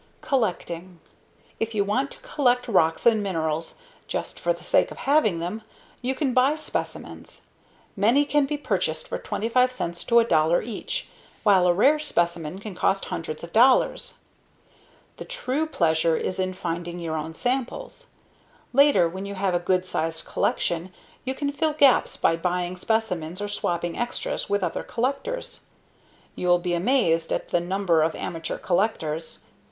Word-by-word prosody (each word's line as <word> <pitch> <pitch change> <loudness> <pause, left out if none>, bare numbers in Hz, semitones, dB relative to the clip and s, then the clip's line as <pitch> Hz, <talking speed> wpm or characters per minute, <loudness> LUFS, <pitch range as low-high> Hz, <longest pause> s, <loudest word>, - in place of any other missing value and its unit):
COLLECTING 180 - -2 0.6
If 225 0 -2
you 205 - +3
want 255 +8 0
to - - -9
collect 245 -4 +1
rocks 165 -7 +2
and 225 -3 +5
minerals 165 -4 -2 0.3
just - - -4
for - - +1
the - - -4
sake - - +3
of - - -10
having 275 - +2
them, 175 +7 -4 0.4
you 260 +1 -1
can 265 -2 0
buy 260 +4 +4
specimens. 310 - -5 0.5
Many 235 +8 +4
can 290 -1 +2
be 295 - -2
purchased 290 - -1
for - - -4
25 250 +3 +1
cents 170 -9 -4
to 235 - +1
$1 170 -7 +4
each, 240 - -4 0.4
while 190 -4 +5
a 175 - +5
rare 285 +10 +4
specimen 175 - -1
can 205 0 -7
cost 195 +2 +1
hundreds 155 -1 -5
of 170 - -9
dollars. 250 +3 +4 1.0
The - - -6
true 315 - -2
pleasure 165 - +2
is 185 - -3
in 185 0 0
finding 170 0 -4
your 165 -2 -3
own 160 +1 -4
samples. 270 - -3 0.7
Later, 280 -9 +5
when 190 +4 -6
you 200 - -5
have 190 -1 0
a 175 - +2
good 180 +1 +1
sized 165 -2 -2
collection, 175 +2 -1 0.3
you 260 +1 -2
can 285 0 -1
fill 305 +2 0
gaps 280 -4 +4
by 165 - +3
buying 180 +1 -1
specimens 185 -5 -1
or 205 - -2
swapping 175 -4 -2
extras 240 0 -2
with 205 -1 +1
other 175 - -1
collectors. 280 - -3 0.7
You'll 175 0 +3
be 175 0 -2
amazed 170 -4 +2
at - - -2
the 175 - +2
number 175 -2 +1
of 160 +1 +1
amateur 165 -1 -4
collectors. 170 -5 -1
195 Hz, 155 wpm, -25 LUFS, 170-255 Hz, 1.0 s, and